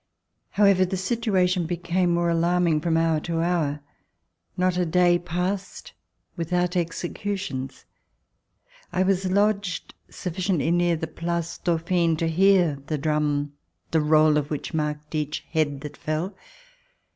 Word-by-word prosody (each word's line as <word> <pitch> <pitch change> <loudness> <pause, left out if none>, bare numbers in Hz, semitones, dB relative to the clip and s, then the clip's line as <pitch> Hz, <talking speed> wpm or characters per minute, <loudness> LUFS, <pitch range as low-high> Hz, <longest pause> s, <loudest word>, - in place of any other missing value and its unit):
HOWEVER, 200 -2 +4
the 190 +1 -3
situation 185 -4 +1
became 175 +1 0
more 170 0 +1
alarm 175 +2 +2
ln{T 155 -3 +2
from 165 0 +1
hour 165 -1 +2
to 165 +1 -3
hour. 160 -4 0 0.8
Not 180 0 +2
a 180 - +1
day 175 +1 +3
passed 180 +3 -4 0.4
w 170 - -2
ithout 180 0 0
executions. 175 -5 -3 1.1
I 185 - +1
was 190 0 +1
lodged 200 -2 0 0.2
sufficiently 180 -2 -1
near 175 0 +2
the 160 - -3
Place 170 0 -4
Dauphine 170 -1 +1
to 165 - 0
hear 175 -4 +3
the 155 - -1
drum, 145 -1 0 0.4
the 160 - +3
roll 155 0 +4
of 145 -1 -1
which 150 - -4
marked 150 -1 -3
each 150 0 -3
head 145 -4 0
that 150 -1 -7
fell. 155 +5 -3
170 Hz, 135 wpm, -25 LUFS, 155-180 Hz, 1.1 s, HOWEVER